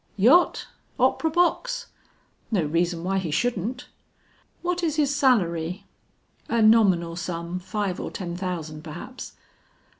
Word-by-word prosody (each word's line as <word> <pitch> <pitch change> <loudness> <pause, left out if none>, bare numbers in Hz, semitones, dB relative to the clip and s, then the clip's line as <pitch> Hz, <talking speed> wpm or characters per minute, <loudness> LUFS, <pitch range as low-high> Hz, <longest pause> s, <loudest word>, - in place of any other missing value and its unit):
"Yacht, 260 - +4 0.3
opera 320 - +2
box?" 485 +9 +1 0.6
"No 195 -7 +1
reason 170 +2 0
why 195 +1 0
he 180 -4 -3
shouldn't." 240 - -1 0.8
"What 355 0 -1
is 320 -3 0
his 290 -2 +2
salary?" 185 - +1 0.6
"A 235 - +1
nominal 190 -7 +4
sum, 170 0 -4
five 195 0 -3
or - - -4
ten 175 -3 -5
thousand 165 -5 -5
perhaps." 170 +11 -8
190 Hz, 120 wpm, -25 LUFS, 170-260 Hz, 0.8 s, Yacht